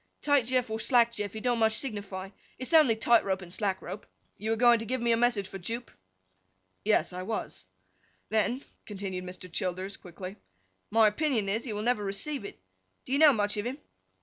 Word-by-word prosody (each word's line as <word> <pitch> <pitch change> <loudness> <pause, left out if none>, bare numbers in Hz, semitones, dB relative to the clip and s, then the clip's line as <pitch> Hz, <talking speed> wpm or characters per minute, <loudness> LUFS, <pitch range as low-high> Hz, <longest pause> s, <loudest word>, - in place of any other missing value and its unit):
'Tight 285 -5 +3
Jeff 255 -3 +1
or 220 - -2
Slack 235 0 +4
Jeff, 210 -2 -4
it 220 - -6
don't 245 -2 +1
much 220 -1 +4
signify: 200 -6 -3 0.3
it's 255 +6 -3
only 300 -8 +6
tight 230 +1 +4
rope 190 -1 -1
and 175 0 -8
slack 195 -2 -1
rope. 210 - -7 0.3
You 215 - -5
were 225 - +2
going 240 0 +5
to 225 - -5
give 260 +1 -1
me 235 0 +1
a - - +5
message 230 -4 +1
for 195 - -8
Jupe?' 230 +6 -5 0.9
'Yes, 210 -3 +2
I 180 - -4
was.' 185 - -4 0.6
'Then,' 220 +5 +1 0.2
continued 190 -3 -5
Mr. 185 0 -8
Childers, 185 +1 -3
quickly, 185 +2 -9 0.5
'my 220 0 +5
opinion 230 -2 0
is, 220 +5 -1
he 230 - -4
will 210 +1 -3
never 235 -3 +1
receive 205 +7 -2
it. - - -9 0.5
Do - - -9
you 280 - +3
know 310 -2 +8
much 210 -3 0
of 205 - -2
him? 260 +3 -4
220 Hz, 205 wpm, -29 LUFS, 195-240 Hz, 0.9 s, know